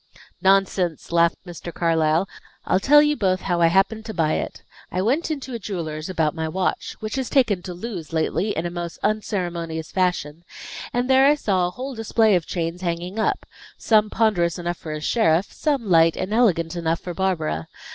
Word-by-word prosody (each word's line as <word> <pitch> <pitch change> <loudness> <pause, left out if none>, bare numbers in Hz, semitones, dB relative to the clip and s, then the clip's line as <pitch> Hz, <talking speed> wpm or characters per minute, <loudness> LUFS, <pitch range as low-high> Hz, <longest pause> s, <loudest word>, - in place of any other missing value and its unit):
"Nonsense!" 190 -4 +1
laughed 170 0 +3
Mr. 175 -1 -8
Carlyle. 165 +1 +1 0.4
"I'll 185 - +2
tell 295 +8 +6
you 295 0 +2
both 185 -6 0
how 175 -2 -1
I 165 - +6
happened 195 +6 +2
to 220 -2 -6
buy 160 -2 +1
it. - - -4 0.3
I 180 - -2
went 260 - +1
into 275 -4 -4
a 235 - -4
jeweller's 165 -6 -5
about 160 -4 0
my 160 -1 -3
watch, 185 +3 -2
which 215 +4 -4
has 260 -2 -2
taken 230 -10 +2
to 180 0 -7
lose 180 -5 -6
lately 165 +5 0
in 165 - -1
a 175 - -3
most 175 -1 -5
unceremonious 170 -6 -2
fashion, 175 -4 -1 0.5
and 245 +1 0
there 265 +1 +5
I 295 - +5
saw 190 -10 +1
a - - -3
whole 260 +8 -6
display 225 -1 +2
of 175 -4 +1
chains 170 0 -3
hanging 175 +3 -3
up; 220 - 0 0.3
some 215 -1 +3
ponderous 190 -7 +1
enough 175 -1 -3
for 155 - -7
a 155 0 -4
sheriff, 175 -1 +1
some 280 -7 -1
light 165 -2 +4
and 185 +3 -3
elegant 180 -8 +2
enough 165 -1 -1
for 180 - -5
Barbara. 160 - -1
180 Hz, 190 wpm, -23 LUFS, 165-220 Hz, 0.5 s, tell